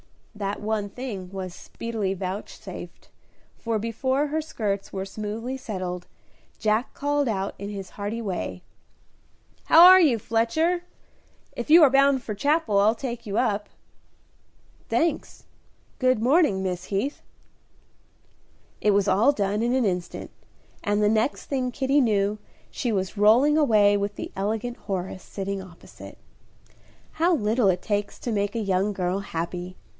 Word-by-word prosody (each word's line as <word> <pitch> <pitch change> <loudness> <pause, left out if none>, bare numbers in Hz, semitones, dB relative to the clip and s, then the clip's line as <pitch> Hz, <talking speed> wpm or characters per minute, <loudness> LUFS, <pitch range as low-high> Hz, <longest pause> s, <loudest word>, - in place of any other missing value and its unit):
That 205 -1 -4
one 210 -1 -2
thing 200 -6 -6
was 190 -2 -5
speedily 215 -3 -4
vouchsafed, 190 +2 -7 0.5
for 230 -1 -1
before 260 +6 -1
her 310 +2 -1
skirts 205 -10 -3
were 190 -1 -4
smoothly 215 +6 -5
settled, 185 -7 -5 0.5
Jack 215 +2 0
called 290 -1 0
out, 195 -3 -2
in 200 +1 -5
his 195 -3 -7
hearty 205 +3 -4
way, 190 -4 -4 1.0
"How 325 +2 +8
are 370 +1 +10
you, 280 -9 +4
Fletcher? 275 - 0 0.7
If - - -5
you 325 +1 +8
are 280 - +6
bound 275 -1 +4
for 215 - -4
Chapel 260 -2 +1
I'll 215 +3 +4
take 235 -1 -6
you 200 +1 -2
up." 210 -4 0 1.2
"Thanks; 325 -2 -1 0.6
good 255 -3 +3
morning, 255 - +3
Miss 180 -1 -3
Heath." 210 +9 -2 1.6
It 210 - +3
was 200 -1 +2
all 210 +9 +4
done 205 -4 -1
in 240 +2 +1
an 260 -3 +2
instant, 180 -3 -3 0.5
and 205 +1 +1
the 210 - +4
next 220 +5 0
thing 260 -3 -1
Kitty 275 +3 +2
knew 210 -3 +1 0.3
she 245 - -2
was 190 0 -2
rolling 235 +9 +5
away 215 -9 +4
with 200 0 -2
the - - -6
elegant 220 +5 -2
Horace 185 -1 -4
sitting 195 0 -4
opposite. 180 -3 -13 0.9
How 340 +2 +2
little 220 -3 +1
it 180 -2 +1
takes 205 -1 -2
to 240 - -4
make 205 0 -1
a - - 0
young 195 0 0
girl 185 0 -1
happy! 180 0 -5
215 Hz, 145 wpm, -25 LUFS, 195-255 Hz, 1.6 s, are